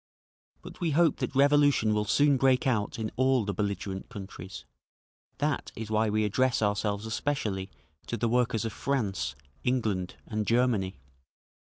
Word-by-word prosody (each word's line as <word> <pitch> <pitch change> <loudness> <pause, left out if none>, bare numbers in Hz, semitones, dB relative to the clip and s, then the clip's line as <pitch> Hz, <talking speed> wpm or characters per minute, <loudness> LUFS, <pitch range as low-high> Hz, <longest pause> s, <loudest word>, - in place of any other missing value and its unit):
But - - -11
we 170 - +1
hope 170 -4 +4
that - - -3
revolution 145 -5 +4
will 105 0 0
soon 145 +6 +4
break 130 0 +3
out 110 -6 0
in 110 -1 -3
all 130 -3 +3
the 100 - -2
belligerent 100 -1 -3
countries; 95 -3 -9 0.7
that - - -1
is 110 -1 -6
why 110 0 +2
we 110 +1 +1
address 125 +3 +1
ourselves 105 0 0
especially 110 -6 -2 0.4
to 120 - -2
the 115 - 0
workers 120 -1 +1
of 110 - -3
France, 100 - -1 0.3
England 110 -8 -1
and 105 -1 -3
Germany…. 115 -6 +2
110 Hz, 150 wpm, -28 LUFS, 100-130 Hz, 0.7 s, hope